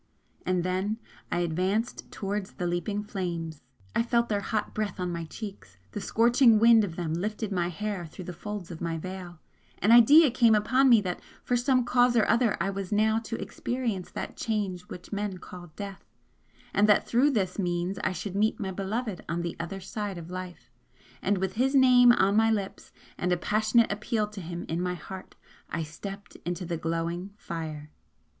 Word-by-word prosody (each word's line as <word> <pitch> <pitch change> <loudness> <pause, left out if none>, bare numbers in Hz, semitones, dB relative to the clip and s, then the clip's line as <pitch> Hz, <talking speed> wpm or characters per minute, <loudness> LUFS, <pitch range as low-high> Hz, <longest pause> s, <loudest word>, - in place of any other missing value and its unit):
And 180 -1 +1
then 190 +4 -1 0.3
I 175 - +1
advanced 185 +7 -1
towards 200 0 -3
the 180 - -4
leaping 175 +4 -1
flames. 170 -6 -4 0.3
I - - +4
felt 235 0 +1
their 205 -2 0
hot 215 +1 -2
breath 210 -4 -3
on 180 -1 -1
my 170 -1 -4
cheeks 190 - -9
the - - -5
scorching 235 0 +5
wind 225 0 +6
of 175 -5 -4
them 170 -3 -2
lifted 210 +4 -2
my 175 -3 0
hair 195 -1 -4
through 180 +3 -10
the 180 - -6
folds 200 0 -6
of 165 - -8
my 165 -1 -2
veil 180 0 -7 0.4
an 210 - +2
idea 275 +6 +8
came 230 -3 +5
upon 255 +6 +3
me 230 -3 +7
that 180 -3 -3 0.2
for 245 - +1
some 250 0 +2
cause 245 0 +4
or 220 - +4
other 235 -3 +3
I 195 +3 0
was 195 -1 -5
now 220 +1 +3
to 225 0 -5
experience 235 -7 -3
that - - -6
'Change 205 -5 -2
which 180 +3 -9
men 205 -2 -2
call 180 0 -10
Death' 200 -2 -8 0.6
and 210 +1 +4
that 210 - +4
through 255 +5 +4
this 200 -8 -1
means 175 +1 -1
I - - +1
should 185 +2 -5
meet 215 +2 +1
my 195 -3 -3
Beloved 200 +2 -3
on 170 0 -1
the 170 - -3
other 175 +3 -4
side 195 0 -5
of 170 +1 -8
life 185 -1 -7 0.5
and 205 - +1
with 190 0 -1
his 265 +6 +1
name 250 -2 +7
on 200 -3 +3
my 225 +1 +5
lips, 200 -3 -3 0.3
and 180 - 0
a 180 - +3
passionate 215 +5 +2
appeal 210 +1 -1
to 210 -2 -8
him 170 0 -6
in 165 +2 -2
my 180 0 -1
heart, 190 +1 -9 0.3
I 170 - -2
stepped 195 +6 -8
into 175 +1 -3
the 170 -1 -2
glowing 170 +4 -3
fire. 155 -5 -6
195 Hz, 190 wpm, -28 LUFS, 175-220 Hz, 0.6 s, idea